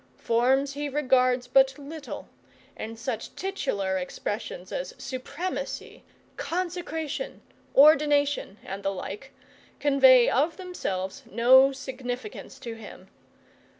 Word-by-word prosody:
Forms 265 +4 +2
he 290 +1 -3
regards 255 -3 +2
but 265 +1 +4
little, 290 +1 -8 0.5
and 225 +1 -6
such 230 -1 -4
titular 205 - -1
expressions 215 - -5
of - - -5
supremacy, 280 +8 -5 0.3
consecration, 345 - -3 0.3
ordination, 290 -6 +5
and 195 +1 -5
the 195 - 0
like, 195 +6 -6 0.5
convey 265 -4 +6
of 300 +6 +1
themselves 195 - -4
no 260 +5 +6
significance 265 +4 -6
to 245 -4 -7
him. 225 -2 -12
265 Hz, 100 wpm, -27 LUFS, 235-300 Hz, 0.5 s, convey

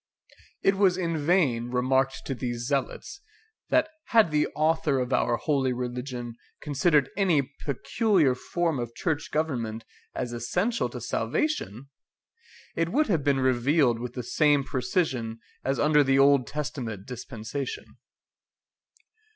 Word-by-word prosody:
It 195 0 +3
was 190 -2 +3
in 170 -3 -1
vain 145 -7 +1
remarked 130 +2 +1
to 135 - -2
these 120 -2 -4
zealots, 140 - -3 0.5
that - - +3 0.2
had 225 -8 +4
the 150 0 +2
Author 155 -2 +2
of 125 0 -1
our 120 -1 +2
holy 135 -3 0
religion 125 -1 -5 0.3
considered 145 -1 +2
any 165 -9 +2
peculiar 160 - +2
form 165 +3 -2
of 120 -1 -5
church 160 -3 -2
government 120 -8 -2 0.3
as 120 - -3
essential 180 - -1
to - - -7
salvation, 140 - -2 0.9
it 165 0 0
would 295 - +1
have 165 -7 +1
been 140 -2 +2
revealed 130 0 +2
with 125 0 -5
the 125 - -5
same 145 +3 +3
precision 125 -5 -1 0.2
as 135 0 -1
under 150 0 +4
the 135 0 +2
Old 140 -2 +5
Testament 130 -9 -5
dispensation. 125 +2 -6
140 Hz, 130 wpm, -27 LUFS, 125-160 Hz, 0.9 s, Old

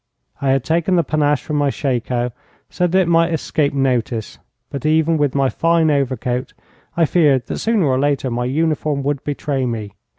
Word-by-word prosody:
I 140 - 0
had 135 -1 +2
taken 170 +5 +1
the 170 - +3
panache 150 -2 +1
from 150 - -2
my 145 -1 +2
shako 125 -3 -1 0.4
so 180 - +1
that 185 +2 +3
it 180 - 0
might 165 0 +3
escape 155 -2 0
notice, 125 -5 -1 0.3
but 140 - -5
even 160 +1 +2
with 145 -3 0
my 135 -1 +3
fine 165 +2 +2
overcoat 130 -3 -1 0.4
I 165 - +4
feared 145 -7 +3
that - - -5
sooner 220 -6 +1
or 130 -2 +1
later 140 -2 0
my 120 +1 -1
uniform 150 0 0
would 140 -1 -2
betray 140 -2 -2
me. 110 -4 -4
145 Hz, 185 wpm, -19 LUFS, 130-160 Hz, 0.4 s, I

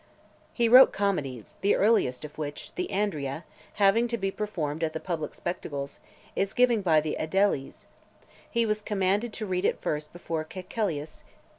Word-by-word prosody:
He 235 -1 +2
wrote 255 +3 +9
comedies, 145 - -2
the 200 - +3
earliest 195 - +2
of 150 - -10
which, 145 -1 -6
The 180 - -2
Andria, 160 -7 -1 0.3
having 210 +4 +4
to 235 0 -2
be 195 -2 -1
performed 165 -7 -3
at 155 -1 0
the 160 - -3
public 160 -2 -4
spectacles 140 -5 -5 0.6
given 245 -3 +4
by 160 -5 +4
the 155 0 -2
aediles, 160 -4 0 0.6
he 235 -1 +1
was 215 -1 0
commanded 205 +2 0
to 215 - -4
read 185 -2 -1
it - - +1
first 150 0 -3
before 165 -2 -4
Caecilius. 170 -3 -4
185 Hz, 155 wpm, -28 LUFS, 155-210 Hz, 0.6 s, wrote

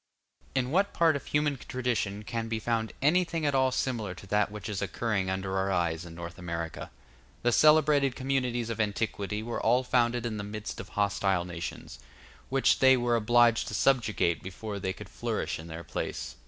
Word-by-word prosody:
In 130 -1 0
what 195 +5 +2
part 165 -2 +4
of 140 - -5
human 150 -1 +1
tradition 120 -6 -2
can 115 +1 -3
be 115 0 -2
found 110 0 -1
anything 165 +1 +2
at 145 - +2
all 130 -1 +3
similar 115 -7 -2
to 95 - -12
that 105 +1 +1
which 105 +2 -7
is 105 -3 -3
occurring 105 -5 -1
under 95 0 -2
our 95 0 0
eyes 85 -2 0
in 85 - -10
North 85 +1 -8
America? 85 -2 -5 0.5
The 120 - +3
celebrated 150 -1 +5
communities 125 -3 -1
of 115 -1 -1
antiquity 105 0 -2
were 120 +1 -3
all 125 +3 +3
founded 120 -1 +1
in 110 -2 -2
the 100 - -4
midst 105 +1 -6
of 95 - -8
hostile 100 -3 +1
nations, 85 -8 -7 0.5
which 135 0 +3
they 130 0 +6
were 120 -1 +1
obliged 120 +1 +4
to 105 - -4
subjugate 105 -9 +2
before 100 +2 -6
they 95 0 -2
could - - -9
flourish - - -3
in 80 - -9
their 80 0 -7
place. - - -4
110 Hz, 185 wpm, -29 LUFS, 95-130 Hz, 0.5 s, they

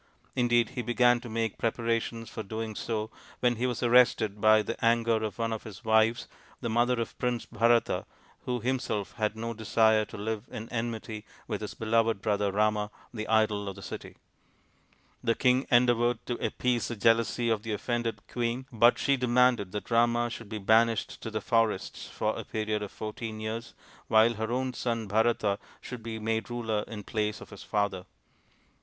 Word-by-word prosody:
Indeed 120 -2 +3
he 125 - -4
began 120 0 +3
to 120 0 -9
make 115 -1 -2
preparations 115 0 -1
for 110 - -6
doing 110 +1 -4
so 110 +1 -3 0.3
when 120 -2 +2
he 125 +2 0
was 125 0 -2
arrested 115 -4 +4
by 110 0 +6
the 115 - -3
anger 115 -1 +3
of 110 - -3
one 115 -1 -1
of 110 - -4
his 110 +1 -11
wives, 110 +1 +3 0.3
the 120 - -3
mother 120 +2 +2
of 115 - -3
Prince 125 -2 -1
Bharata, 115 +1 +2 0.4
who 125 -1 -1
him 130 +3 0
self 105 -4 -3
had 110 -1 0
no 115 +1 -4
desire 110 0 +3
to - - -10
live 110 +1 -3
in 110 +1 -7
enmity 115 -2 -4 0.2
with 105 -3 -3
his 105 - -6
beloved 115 -1 +1
brother 100 0 0
Rama, 105 0 +1 0.2
the 110 -2 -4
idol 105 -2 +2
of 95 - -7
the 100 - -11
city. - - -7 1.1
The 115 -1 +2
king 130 0 +2
endeavoured 120 -1 +3
to 125 - -2
appease 125 -2 0
the 120 - -4
jealousy 115 +2 +2
of 110 -2 +1
the 110 0 -3
offended 120 +2 -2
queen, 120 +1 -2
but 120 +1 +5
she 140 -1 +2
demanded 125 -5 +3
that 105 +3 -5
Rama 120 0 +3
should 115 -3 -8
be 110 - -4
banished 110 +2 +2
to - - -4
the 110 0 -3
forests 115 -4 0
for - - -2
a - - -5
period 110 -1 -2
of 105 - -5
fourteen 110 0 -6
years 110 +2 -5 0.3
while 110 +2 +5
her 110 +1 -3
own 130 +1 -1
son 115 -3 -2
Bharata 110 -1 +2 0.2
should 125 -2 -8
be 115 0 -5
made 110 0 -2
ruler 110 -3 -2
in 105 -2 -7
place 105 +1 -2
of - - -12
his 100 - -10
father. 100 -3 -1
115 Hz, 185 wpm, -29 LUFS, 110-120 Hz, 1.1 s, by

